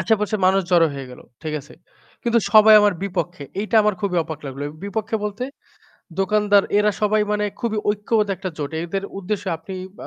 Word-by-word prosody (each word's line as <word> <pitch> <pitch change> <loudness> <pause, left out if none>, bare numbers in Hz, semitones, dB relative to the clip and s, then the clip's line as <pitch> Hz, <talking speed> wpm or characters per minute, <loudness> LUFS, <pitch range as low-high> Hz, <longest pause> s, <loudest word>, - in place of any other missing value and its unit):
আশেপাশে 210 +3 +1
মানুষ 195 +1 +4
জড়ো 170 -2 +5
হয়ে 135 -2 -7
গেল। 125 - -12 0.2
ঠিক 155 -1 -3
আছে? 145 - -16 0.5
কিন্তু 235 -1 +2
সবাই 215 0 +8
আমার 205 -2 +3
বিপক্ষে। 180 -5 -3 0.2
এইটা 215 +2 0
আমার 210 -1 +2
খুবই 195 -3 -1
অবাক 160 -1 -7
লাগল। 135 +1 -7
এ - - -5
বিপক্ষে 220 +2 -2
বলতে 210 +4 -3 0.8
দোকানদার 205 0 +3 0.2
এরা 210 0 +3
সবাই 210 0 +3
মানে 210 0 0 0.2
খুবই 225 -3 -1
ঐক্যবদ্ধ 210 0 +1
একটা 190 0 -4
জোট। 145 0 -3
এদের 195 +3 -3 0.2
উদ্দেশ্যে 200 0 -3
আপনি 190 +4 -9 0.2
বা - - -8
200 Hz, 185 wpm, -21 LUFS, 175-210 Hz, 0.8 s, সবাই